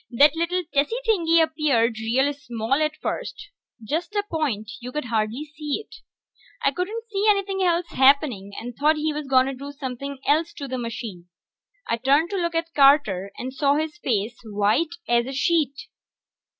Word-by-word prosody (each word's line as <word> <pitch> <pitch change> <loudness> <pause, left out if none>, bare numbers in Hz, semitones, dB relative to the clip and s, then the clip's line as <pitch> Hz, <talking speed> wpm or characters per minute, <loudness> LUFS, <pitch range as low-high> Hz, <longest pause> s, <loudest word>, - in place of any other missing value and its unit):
That 280 +5 +5
little 345 +2 0
tessy 290 +10 +2
thing 405 -8 +1
appeared, 290 -8 +2
real 260 +6 +1
small 240 -4 -3
at 305 +2 +1
first. - - -4 0.3
Just 335 - -3
a 410 - +1
point; 245 -10 -2
you 250 +1 -7
could 300 0 -3
hardly 225 +4 -1
see 295 +1 -2
it. 440 - -14 0.7
I 275 - +4
couldn't 415 - -4
see 400 +1 0
anything 395 -1 +1
else 350 -1 +2
happening, 265 -7 +3
and 240 0 -7
thought 300 +4 +3
he 305 0 -1
was 300 -1 -5
gonna 265 0 +3
do 280 +2 -8
somepin' 275 0 -6
else 315 +3 +2
to 280 - -7
the 260 -1 -3
machine. 225 -6 -6 0.6
I 230 - 0
turned 280 - +2
to 400 - -1
look 340 -2 -1
at 330 0 -2
Carter, 275 -10 +4
and 255 +1 -5
saw 280 +1 +2
his 305 0 -2
face 225 -3 -1
was 215 -3 -10
white 235 +12 +2
as 235 0 +2
a 270 - -5
sheet. 285 -1 +1
280 Hz, 175 wpm, -24 LUFS, 240-320 Hz, 0.7 s, That